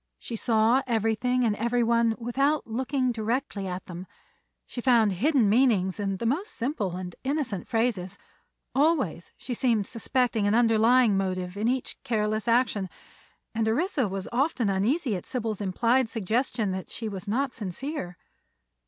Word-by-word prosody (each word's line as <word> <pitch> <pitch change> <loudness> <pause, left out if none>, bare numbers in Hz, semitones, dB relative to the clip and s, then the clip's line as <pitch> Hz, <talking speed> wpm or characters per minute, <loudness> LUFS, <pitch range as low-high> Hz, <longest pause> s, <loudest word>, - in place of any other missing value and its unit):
She 235 - -7
saw 225 +3 +3
everything 230 +2 +1
and 220 -3 +2
everyone 235 0 +2
without 275 +6 0
looking 255 +3 -1
directly 225 -2 -2
at 180 0 -5
them; 180 0 -8 0.6
she 245 - -6
found 235 -5 +4
hidden 250 - +2
meanings 210 -5 +3
in 195 -2 -1
the 230 - -4
most 320 - -1
simple 230 - -2
and 180 -1 -6
innocent 270 - -2
phrases; 225 -6 -1 0.6
always 270 - +1
she 255 - -5
seemed 230 -4 +1
suspecting 230 -1 0
an 205 - +3
underlying 230 -1 +4
motive 185 -1 -2
in 210 +3 -1
each 255 +1 -2
careless 215 -3 -1
action, 230 -5 +2 0.6
and 225 -1 0
Orissa 275 - +1
was 195 0 -4
often 250 -3 +1
uneasy 230 - +1
at 180 - -7
Sybil's 225 -5 -3
implied 230 +6 +2
suggestion 225 0 -1
that 190 0 -5
she 225 - -5
was 200 -1 -6
not 255 +5 0
sincere. 210 - -5
230 Hz, 145 wpm, -27 LUFS, 200-255 Hz, 0.6 s, found